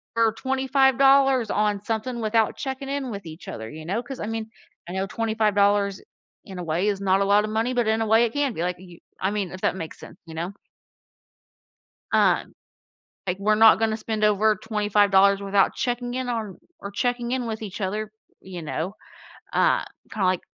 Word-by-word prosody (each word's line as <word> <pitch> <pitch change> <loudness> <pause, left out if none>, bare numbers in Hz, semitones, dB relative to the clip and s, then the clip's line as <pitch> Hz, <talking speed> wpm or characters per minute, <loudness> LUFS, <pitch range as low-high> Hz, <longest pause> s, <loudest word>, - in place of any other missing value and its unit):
for 230 -1 +3
$25 265 -1 +3
on 210 -1 +1
something 230 +2 -2
without 220 0 +1
checking 270 0 -5
in 275 -3 -3
with 200 -3 -7
each 160 +1 -10
other," 110 0 -6
you 155 +1 -9
know? 205 +8 -2
'Cause, 265 +1 -8
I - - -3
mean, 225 0 -4 0.4
I - - -6
know 190 +1 -1
$25, 205 -3 +1 0.4
in 190 -2 -9
a - - -4
way, 170 +4 0
is 200 -2 -1
not 195 0 +2
a - - +2
lotta 205 +2 +3
money, 225 +3 -1
but 240 -3 +1
in 220 +1 +1
a 225 - 0
way, 225 +2 +5
it 225 - -4
can 285 -2 +1
be, 165 - -4
like, 180 0 -2
y 175 -2 -14 0.2
I 190 - +1
mean, 200 -4 -2
if 185 - -9
that - - +1
makes 165 -3 -7
sense, - - -12
you 165 - -10
know? 170 +3 -4 1.6
Um, - - +2 0.7
like, 180 0 -2
"We're 210 +2 +2
not 220 +1 +7
gonna 220 -1 +1
spend 215 -1 -2
over 210 +1 +3
$25 205 -2 +3
without 200 0 +2
checking 245 0 -2
in 255 0 -3
on 220 -6 -3 0.2
or 200 - -6
checking 240 +3 -1
in 255 -2 -1
with 220 -1 -4
each 205 -2 -7
other," 210 +2 -3 0.3
you 180 -3 -8
know? 160 +5 -4 0.6
Uh, - - +3 0.3
kinda 205 -4 -1
like 185 -1 +1
215 Hz, 195 wpm, -24 LUFS, 195-235 Hz, 1.6 s, not